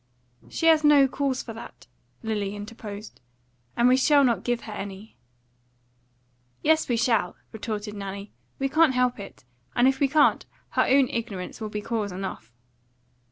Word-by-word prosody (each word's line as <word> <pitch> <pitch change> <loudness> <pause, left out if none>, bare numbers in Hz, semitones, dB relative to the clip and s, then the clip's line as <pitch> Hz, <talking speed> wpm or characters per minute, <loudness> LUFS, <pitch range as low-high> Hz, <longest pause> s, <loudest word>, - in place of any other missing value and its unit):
"She 325 - -3
has 320 -1 +6
no 290 -2 +6
cause 265 -1 -2
for 225 - -7
that," 225 - -11 0.4
Lily 210 -2 -2
interposed, 210 -2 -9 0.6
"and 235 - +4
we 250 - +6
shall 285 +2 +5
not 240 -3 +2
give 240 -1 -1
her 215 - -8
any." 200 +1 -8 1.5
"Yes, 315 -1 +3
we 240 - +2
shall," 225 -6 +1 0.2
retorted 215 -1 -5
Nanny. 200 0 -7 0.3
"We 270 - 0
can't 305 -1 +3
help 250 -2 +1
it; 200 - -10 0.3
and 245 +1 +5
if 265 0 +1
we 280 - +3
can't, 295 +2 +3 0.2
her - - +1
own 270 0 +5
ignorance 220 -3 -5
would 215 -1 -4
be 210 - -3
cause 215 -2 -2
enough." 180 - -6
230 Hz, 160 wpm, -26 LUFS, 205-265 Hz, 1.5 s, has